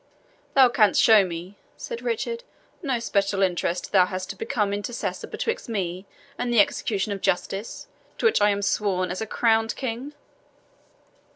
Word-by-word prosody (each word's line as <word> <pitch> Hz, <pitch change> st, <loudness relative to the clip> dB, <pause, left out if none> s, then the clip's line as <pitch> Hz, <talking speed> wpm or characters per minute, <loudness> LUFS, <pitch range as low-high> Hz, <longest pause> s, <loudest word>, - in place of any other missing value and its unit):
"Thou 265 Hz, -2 st, +8 dB
canst 215 Hz, -5 st, +3 dB
show 220 Hz, -3 st, +7 dB
me," 180 Hz, +2 st, -6 dB, 0.2 s
said 475 Hz, -1 st, -6 dB
Richard, 470 Hz, 0 st, -2 dB, 0.4 s
"no 270 Hz, -7 st, 0 dB
special 200 Hz, -3 st, 0 dB
interest 180 Hz, -1 st, -1 dB
thou 185 Hz, -3 st, +5 dB
hast 185 Hz, 0 st, -4 dB
to -, -, -9 dB
become 210 Hz, -1 st, -1 dB
intercessor 205 Hz, +4 st, -4 dB
betwixt 460 Hz, -, -3 dB
me 190 Hz, -3 st, -3 dB, 0.3 s
and 245 Hz, -1 st, -1 dB
the 235 Hz, -, +4 dB
execution 205 Hz, 0 st, +1 dB
of 195 Hz, -1 st, -4 dB
justice, 195 Hz, +4 st, -2 dB, 0.3 s
to -, -, -3 dB
which 445 Hz, -, +4 dB
I 205 Hz, -, +5 dB
am 200 Hz, 0 st, 0 dB
sworn 185 Hz, -3 st, 0 dB
as 185 Hz, -, -4 dB
a 220 Hz, -, -3 dB
crowned 225 Hz, 0 st, +2 dB
king." 260 Hz, +3 st, -5 dB
205 Hz, 160 wpm, -25 LUFS, 195-240 Hz, 0.4 s, Thou